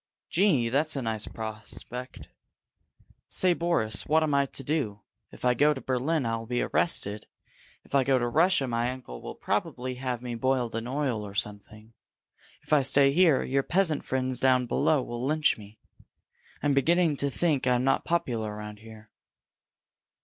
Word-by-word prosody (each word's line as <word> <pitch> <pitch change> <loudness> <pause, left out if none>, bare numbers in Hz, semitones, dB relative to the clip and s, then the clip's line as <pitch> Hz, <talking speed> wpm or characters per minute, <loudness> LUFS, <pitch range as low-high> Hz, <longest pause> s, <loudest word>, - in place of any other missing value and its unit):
"Gee! 165 - +3
That's 150 +5 +1
a 135 - -2
nice 110 -2 -2
prospect! 110 +3 -6 1.0
Say, 185 -1 +3
Boris, 165 - 0
what 160 +1 +3
am 150 -2 0
I 140 0 +3
to 135 - -7
do? 125 -8 -2 0.3
If - - -9
I 125 - +4
go 150 +4 +3
to - - -5
Berlin, 130 +3 -1
I'll 115 0 -3
be 120 +1 0
arrested! 105 -10 0 0.6
If - - -20
I 140 -1 +4
go 135 0 +2
back 125 - +1
to 120 - 0
Russia, 160 0 +3
my 120 0 0
uncle 125 - -8
will - - -7
probably 130 +1 -2
have 125 -2 -3
me 120 -1 -4
boiled 125 0 0
in 115 +1 -4
oil 130 -4 -1
or 100 -1 -9
something! 105 +2 -5 0.7
If - - -3
I 150 - +6
stay 135 +1 +4
here, 160 -3 +4
your 135 +1 +1
peasant 165 0 +1
friends 130 -1 -2
down 130 -1 +3
below 140 +3 +1
will 120 0 -5
lynch 155 +3 +2
me! 105 +1 -13 0.9
I'm 145 -1 +2
beginning 165 +3 +3
to 140 - +1
think 145 -2 0
I'm 125 0 +2
not 135 0 +2
popular 120 -11 -1
around 105 0 -8
here!" 110 -1 -14
130 Hz, 170 wpm, -27 LUFS, 115-145 Hz, 1.0 s, I